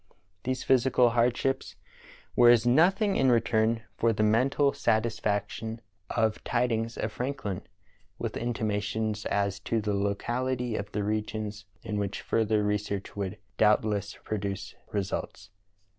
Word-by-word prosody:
These 130 Hz, 0 st, -1 dB
physical 125 Hz, -2 st, +4 dB
hardships 125 Hz, +3 st, +1 dB, 0.6 s
were 120 Hz, -1 st, +7 dB
as 120 Hz, -1 st, +6 dB
nothing 190 Hz, -, +4 dB
in 135 Hz, -, +4 dB
return 115 Hz, -1 st, +2 dB
for 115 Hz, -, +3 dB
the 110 Hz, -1 st, 0 dB
mental 130 Hz, +6 st, +3 dB
satisfaction 110 Hz, 0 st, -1 dB, 0.3 s
of 110 Hz, -2 st, 0 dB
tidings 115 Hz, -2 st, 0 dB
of 110 Hz, -, -2 dB
Franklin, 125 Hz, -6 st, -3 dB, 0.6 s
with -, -, -4 dB
intimations 110 Hz, -2 st, -1 dB
as 100 Hz, -1 st, 0 dB
to 115 Hz, -, -1 dB
the 105 Hz, -1 st, -1 dB
locality 120 Hz, +5 st, -1 dB
of 100 Hz, 0 st, -4 dB
the 105 Hz, -, -1 dB
regions 105 Hz, 0 st, -3 dB, 0.2 s
in 105 Hz, -1 st, -2 dB
which 100 Hz, -1 st, -3 dB
further 110 Hz, -1 st, +1 dB
research 105 Hz, -1 st, -2 dB
would 100 Hz, -2 st, -3 dB, 0.2 s
doubt 105 Hz, 0 st, +5 dB
less 105 Hz, -1 st, -2 dB
produce 100 Hz, -2 st, -4 dB, 0.2 s
results. 100 Hz, -2 st, -3 dB
110 Hz, 130 wpm, -28 LUFS, 105-120 Hz, 0.6 s, were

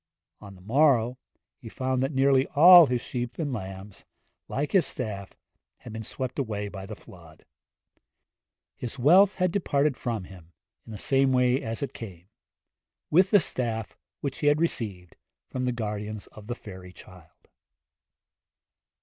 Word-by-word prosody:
On 100 Hz, -2 st, -12 dB
the 90 Hz, -, -17 dB
morrow 125 Hz, +1 st, +2 dB, 0.4 s
he 115 Hz, -, -10 dB
found 130 Hz, +1 st, -2 dB
that 135 Hz, +2 st, 0 dB
nearly 135 Hz, -1 st, +3 dB
all 175 Hz, +2 st, +9 dB
his 125 Hz, -1 st, -1 dB
sheep 120 Hz, -1 st, -5 dB
and 145 Hz, -5 st, -2 dB
lambs, 95 Hz, -2 st, -8 dB, 0.4 s
like 145 Hz, +2 st, -3 dB
his 190 Hz, -3 st, +3 dB
staff, 100 Hz, -6 st, -5 dB, 0.4 s
had 115 Hz, -, -11 dB
been 110 Hz, -, -5 dB
swept 130 Hz, +4 st, -5 dB
away 105 Hz, -5 st, -3 dB
by 95 Hz, -1 st, -8 dB
the 110 Hz, -, -7 dB
flood. 85 Hz, -5 st, -17 dB, 1.3 s
His 125 Hz, +2 st, -6 dB
wealth 180 Hz, +10 st, +5 dB
had 185 Hz, -1 st, +1 dB
departed 150 Hz, -7 st, +1 dB
from 115 Hz, -6 st, -4 dB
him 90 Hz, -2 st, -14 dB, 0.3 s
in -, -, -10 dB
the 105 Hz, -, -6 dB
same 135 Hz, +4 st, +2 dB
way 125 Hz, +1 st, +2 dB
as 115 Hz, +4 st, -3 dB
it 140 Hz, -, -5 dB
came 95 Hz, -6 st, -10 dB, 0.8 s
with 185 Hz, +4 st, +5 dB
the 205 Hz, -, +6 dB
staff 115 Hz, -, -3 dB, 0.3 s
which 140 Hz, -2 st, -4 dB
he 145 Hz, -, 0 dB
had 145 Hz, +1 st, +4 dB
received 105 Hz, -, -3 dB, 0.3 s
from 130 Hz, -1 st, -2 dB
the 125 Hz, -, +1 dB
guardians 105 Hz, -2 st, -5 dB
of 105 Hz, -1 st, -13 dB
the 120 Hz, -, -3 dB
fairy 95 Hz, -5 st, -11 dB
child. 90 Hz, -3 st, -17 dB
120 Hz, 155 wpm, -26 LUFS, 105-140 Hz, 1.3 s, all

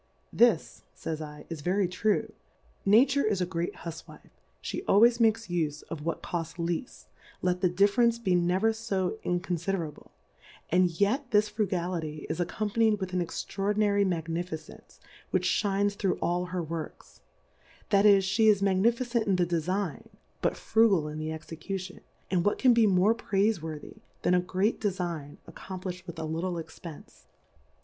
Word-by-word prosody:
This, 230 Hz, -8 st, +3 dB
fays 160 Hz, -1 st, -4 dB, 0.2 s
/, -, -, -14 dB
is 160 Hz, -3 st, -5 dB
very 185 Hz, +4 st, +1 dB
true, 215 Hz, +4 st, 0 dB, 0.5 s
Nature 260 Hz, +7 st, +5 dB
is 210 Hz, -3 st, +1 dB
a 180 Hz, -, +1 dB
great 170 Hz, -1 st, -3 dB
Hufwife, 165 Hz, -1 st, -9 dB, 0.4 s
ihe -, -, -2 dB
always 235 Hz, +4 st, +5 dB
makes 225 Hz, -1 st, +3 dB
ufeof 160 Hz, -3 st, -3 dB
what 165 Hz, +2 st, -3 dB
cofts 165 Hz, -1 st, -4 dB
lea 170 Hz, +7 st, -1 dB
ft, -, -, -17 dB, 0.4 s
let 180 Hz, 0 st, +1 dB
the 185 Hz, -, +3 dB
Difference 205 Hz, +6 st, +3 dB
be 205 Hz, -6 st, 0 dB
never 180 Hz, +5 st, +2 dB
fo 220 Hz, -2 st, -2 dB
inconfide 180 Hz, +1 st, -1 dB
rable; 155 Hz, -3 st, -7 dB, 0.6 s
and 180 Hz, +1 st, +4 dB
yet 245 Hz, +7 st, +1 dB
this 210 Hz, -1 st, +3 dB
Frugality 175 Hz, -7 st, -2 dB
is 160 Hz, -, -4 dB
accony 200 Hz, +4 st, -2 dB
panyM 220 Hz, -2 st, +3 dB
with 185 Hz, -2 st, -4 dB
an 180 Hz, -, +1 dB
extraordinary 200 Hz, +4 st, 0 dB
Magni 165 Hz, -2 st, -1 dB
ficence, 160 Hz, -3 st, -10 dB, 0.3 s
which -, -, 0 dB
fhines 205 Hz, 0 st, +1 dB
through 195 Hz, -2 st, 0 dB
all 175 Hz, +1 st, 0 dB
her 180 Hz, -1 st, -3 dB
Works; 160 Hz, 0 st, -7 dB, 0.7 s
that 200 Hz, -1 st, +5 dB
is, 200 Hz, -2 st, +6 dB
flie 220 Hz, +4 st, +2 dB
is 205 Hz, -2 st, +5 dB
Magnificent 235 Hz, +5 st, +1 dB
in 195 Hz, -, +3 dB
the 180 Hz, -1 st, +2 dB
Defign, 175 Hz, +2 st, -2 dB, 0.3 s
but -, -, 0 dB
Frugal 210 Hz, -9 st, +3 dB
in 155 Hz, +1 st, -6 dB
the 155 Hz, 0 st, -3 dB
Execution; 180 Hz, +4 st, -6 dB, 0.3 s
and 180 Hz, -3 st, +2 dB
what 205 Hz, -, +1 dB
can 255 Hz, -2 st, +5 dB
be 230 Hz, -2 st, +5 dB
more 195 Hz, +3 st, +4 dB
Praife 210 Hz, -4 st, 0 dB
worthy, 155 Hz, -2 st, -7 dB, 0.3 s
than 180 Hz, -, +3 dB
a 180 Hz, -, +5 dB
great 185 Hz, +4 st, 0 dB
Defign 175 Hz, -8 st, -3 dB
accomplifii'd 185 Hz, -1 st, -7 dB
with 170 Hz, -1 st, -8 dB
a 160 Hz, -, -4 dB
little 170 Hz, +3 st, -2 dB
Expence 165 Hz, -1 st, -10 dB
185 Hz, 160 wpm, -28 LUFS, 170-210 Hz, 0.7 s, is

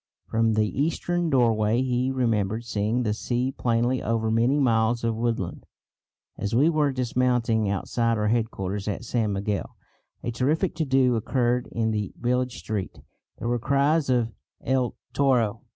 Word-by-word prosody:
From 115 Hz, 0 st, +1 dB
the 110 Hz, 0 st, +2 dB
eastern 170 Hz, +6 st, -1 dB
doorway 115 Hz, -3 st, +2 dB
he 125 Hz, 0 st, 0 dB
remembered 115 Hz, -4 st, 0 dB
seeing 110 Hz, +2 st, 0 dB
the 105 Hz, -2 st, 0 dB
sea 125 Hz, +3 st, -1 dB
plainly 120 Hz, 0 st, 0 dB
over 110 Hz, 0 st, 0 dB
many 120 Hz, +6 st, +2 dB
miles 115 Hz, -2 st, +2 dB
of 115 Hz, -1 st, 0 dB
woodland. 115 Hz, 0 st, -2 dB, 0.7 s
As 105 Hz, +2 st, -2 dB
we 145 Hz, +7 st, +5 dB
were 150 Hz, -3 st, +2 dB
dismounting 120 Hz, -4 st, +1 dB
outside 115 Hz, +3 st, 0 dB
our 105 Hz, 0 st, +1 dB
headquarters 105 Hz, -4 st, -2 dB
at 105 Hz, +3 st, -3 dB
San 115 Hz, -2 st, 0 dB
Miguel 100 Hz, 0 st, -3 dB, 0.5 s
a 120 Hz, -, -2 dB
terrific 150 Hz, +10 st, 0 dB
to 160 Hz, -, 0 dB
do 130 Hz, -2 st, +3 dB
occurred 120 Hz, +2 st, 0 dB
in 110 Hz, -1 st, 0 dB
the 105 Hz, -3 st, -2 dB
village 125 Hz, 0 st, 0 dB
street. 105 Hz, -4 st, -4 dB, 0.4 s
There 115 Hz, -, -4 dB
were 120 Hz, 0 st, 0 dB
cries 140 Hz, +4 st, +2 dB
of 120 Hz, -3 st, +1 dB, 0.3 s
"El 130 Hz, -2 st, 0 dB, 0.2 s
toro! 125 Hz, -7 st, +2 dB
120 Hz, 150 wpm, -25 LUFS, 110-130 Hz, 0.7 s, we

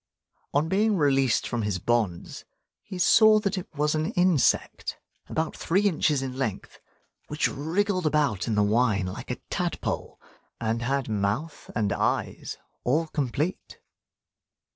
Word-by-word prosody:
On 145 Hz, +3 st, +1 dB
being 205 Hz, +3 st, +2 dB
released 135 Hz, -6 st, +2 dB
from 120 Hz, -2 st, -2 dB
his 105 Hz, -3 st, -1 dB
bonds, 105 Hz, -4 st, -1 dB, 0.4 s
he 195 Hz, -3 st, -8 dB
saw 215 Hz, +4 st, +6 dB
that 200 Hz, -1 st, -1 dB
it 185 Hz, -, -5 dB
was 150 Hz, +1 st, +1 dB
an 155 Hz, +1 st, -1 dB
insect 180 Hz, -5 st, +1 dB, 0.3 s
about 160 Hz, 0 st, -2 dB
three 185 Hz, +4 st, +1 dB
inches 155 Hz, -7 st, +2 dB
in 130 Hz, -1 st, -5 dB
length, 115 Hz, -7 st, -4 dB, 0.5 s
which 150 Hz, 0 st, 0 dB
wriggled 180 Hz, +4 st, -1 dB
about 145 Hz, -10 st, +1 dB
in 110 Hz, -, 0 dB
the 105 Hz, -, +3 dB
wine 105 Hz, -2 st, +2 dB
like 90 Hz, -, -6 dB
a -, -, -1 dB, 0.2 s
tadpole, -, -, -3 dB, 0.4 s
and 115 Hz, 0 st, -1 dB
had 135 Hz, +2 st, -1 dB
mouth 110 Hz, +9 st, -2 dB
and 105 Hz, -2 st, +1 dB
eyes -, -, -2 dB, 0.3 s
all 150 Hz, +7 st, +2 dB
complete. 145 Hz, +5 st, -2 dB
145 Hz, 140 wpm, -26 LUFS, 115-165 Hz, 0.5 s, saw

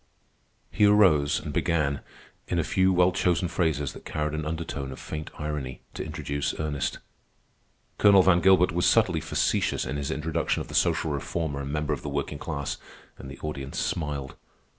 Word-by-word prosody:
He 105 Hz, -, +3 dB
arose 90 Hz, -9 st, +5 dB
and -, -, -6 dB
began, 75 Hz, -4 st, 0 dB, 0.5 s
in 90 Hz, -, -1 dB
a 85 Hz, -, +2 dB
few 95 Hz, +4 st, +2 dB
well 90 Hz, 0 st, +4 dB
chosen 90 Hz, -1 st, +1 dB
phrases 80 Hz, -5 st, 0 dB
that -, -, -12 dB
carried 75 Hz, 0 st, -2 dB
an 75 Hz, 0 st, -3 dB
undertone 75 Hz, -4 st, -4 dB
of 65 Hz, -, -8 dB
faint 75 Hz, -1 st, -6 dB
irony, 75 Hz, -4 st, -4 dB
to -, -, -4 dB
introduce 70 Hz, 0 st, -3 dB
Ernest. 75 Hz, -2 st, -2 dB, 1.0 s
Colonel 100 Hz, -2 st, +7 dB
Van 90 Hz, -2 st, +4 dB
Gilbert 90 Hz, 0 st, +5 dB
was 90 Hz, +2 st, +1 dB
subtly 80 Hz, -, +3 dB
facetious -, -, 0 dB
in 65 Hz, +3 st, -3 dB
his 70 Hz, -1 st, -3 dB
introduction 80 Hz, +1 st, -1 dB
of -, -, -6 dB
the -, -, -8 dB
social 80 Hz, -, +2 dB
reformer 70 Hz, 0 st, -3 dB
and 70 Hz, 0 st, -5 dB
member 75 Hz, 0 st, -1 dB
of -, -, -4 dB
the 75 Hz, -, -5 dB
working 70 Hz, +1 st, -3 dB
class, 75 Hz, -5 st, -3 dB, 0.4 s
and 65 Hz, -, -8 dB
the 70 Hz, -, -9 dB
audience 70 Hz, -3 st, -5 dB
smiled. 75 Hz, -4 st, -2 dB
75 Hz, 175 wpm, -27 LUFS, 70-85 Hz, 1.0 s, Colonel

